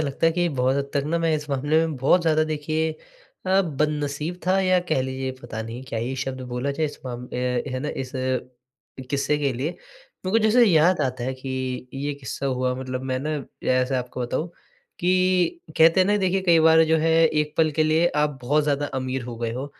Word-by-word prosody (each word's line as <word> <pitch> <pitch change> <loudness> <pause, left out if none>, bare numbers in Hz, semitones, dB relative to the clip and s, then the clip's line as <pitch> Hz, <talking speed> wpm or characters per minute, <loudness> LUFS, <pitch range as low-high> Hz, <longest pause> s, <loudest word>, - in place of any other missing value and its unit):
लगता 145 +1 0
है 165 - +3
कि 175 +1 +1
बहुत 130 -3 +1
हद 140 0 -2
तक 140 - +2
न 165 +2 0
मैं 165 -1 +2
इस 150 0 -4
मामले 145 +3 +1
में 160 - -4
बहुत 135 +8 +3
ज़्यादा 155 -1 +3
देखिए 155 +1 -1 0.6
अ, 190 +1 +4
बदनसीब 150 +1 -2
था 190 +1 +3
या 185 -1 +3
कह 155 - +2
लीजिए 130 0 -3
पता 120 -3 -6
नहीं 115 +3 -7
क्या 115 - -3
ही 120 +4 -2
शब्द 130 0 -4
बोला 125 +3 -1
जाए 155 +3 -1
इस 145 - -8
माम 125 -1 -6
ए 125 0 -1
है 130 -1 -3
ना? 150 - -3
इस 130 -3 -5 1.0
किस्से 140 +1 +1
के 140 -2 0
लिए। 130 +6 -2
मेरे - - -11
को 225 - +5
जैसे 235 +3 +6
याद 175 -2 +4
आता 130 -2 -1
है 130 - -1
कि 130 -1 -4
ये 140 +2 -2
किस्सा 140 0 -5
हुआ 130 -1 0
मतलब 130 0 -5
मैं 130 - 0
न 150 -2 -3 0.2
ऐसा 130 +1 +2
आपको 125 0 -6
बताऊँ 125 +7 -2 0.5
कि 185 - +2 0.2
कहते 165 +3 +6
हैं 185 - +4
न 205 - +3
देखिए 190 -1 +1
कई 170 -3 +5
बार 160 0 +6
जो - - +6
है 160 +1 +2
एक 150 -1 -1
पल 160 -1 +3
के - - +6
लिए 160 +2 +3 0.2
आप 150 -2 -1
बहुत 145 +5 +2
ज़्यादा 145 0 0
अमीर 130 0 -3
हो 120 -1 -7
गए 115 0 -2
हो 130 +4 -4
145 Hz, 220 wpm, -24 LUFS, 130-160 Hz, 1.0 s, जैसे